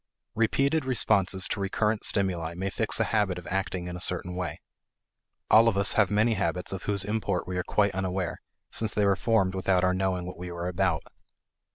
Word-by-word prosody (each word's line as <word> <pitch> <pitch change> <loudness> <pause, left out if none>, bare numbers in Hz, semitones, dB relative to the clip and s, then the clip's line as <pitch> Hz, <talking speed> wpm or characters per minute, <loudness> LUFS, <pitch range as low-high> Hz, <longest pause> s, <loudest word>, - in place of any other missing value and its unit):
Repeated 135 +7 +1
responses 100 -7 +2
to - - -3
recurrent 105 +2 -1
stimuli 85 -5 +1
may 95 +2 -3
fix 110 +1 +1
a - - +3
habit 100 -4 +1
of 90 - -9
acting 95 -2 -3
in 90 - -6
a 90 - -7
certain 90 0 +1
way. 90 -4 -4 0.9
All 115 +1 +7
of 105 -4 +1
us 100 +2 +4
have 105 -3 +3
many 105 +3 +2
habits 90 -1 -2
of 95 - -6
whose 100 -1 +1
import 105 -3 -2
we 90 - -4
are 90 - -1
quite 100 +1 +1
unaware, 95 -1 -3 0.3
since 110 -1 -1
they 105 - +2
were 100 -1 +3
formed 105 -5 +1
without 95 -1 +1
our 90 0 +2
knowing 95 -1 -1
what 90 -1 -8
we 90 0 -6
were 85 0 -4
about. 90 -3 0
95 Hz, 200 wpm, -27 LUFS, 90-105 Hz, 0.9 s, All